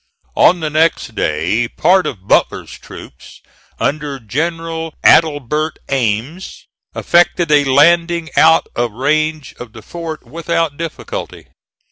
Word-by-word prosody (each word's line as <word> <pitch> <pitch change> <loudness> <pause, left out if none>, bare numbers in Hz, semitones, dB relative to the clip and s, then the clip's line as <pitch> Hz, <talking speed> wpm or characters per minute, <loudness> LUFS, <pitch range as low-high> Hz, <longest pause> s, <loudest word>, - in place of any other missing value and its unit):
On 175 0 +4
the 155 -1 -3
next 155 -6 0
day 85 +7 -1
part 185 +9 +2
of 100 -6 -8
Butler's - - +1
troops - - -13 0.4
under 145 -1 -2
General 165 +6 -4
Adelbert 155 0 +2
Ames 130 - -3 0.3
effected 175 -1 +2
a 145 -1 +4
landing 170 +4 +3
out 160 +1 +5
of 120 -2 -2
range 155 +3 -1
of 120 -3 -10
the 110 -2 -12
fort 165 +3 -7
without 165 -2 -2
difficulty. 170 - -7
155 Hz, 115 wpm, -16 LUFS, 130-165 Hz, 0.4 s, out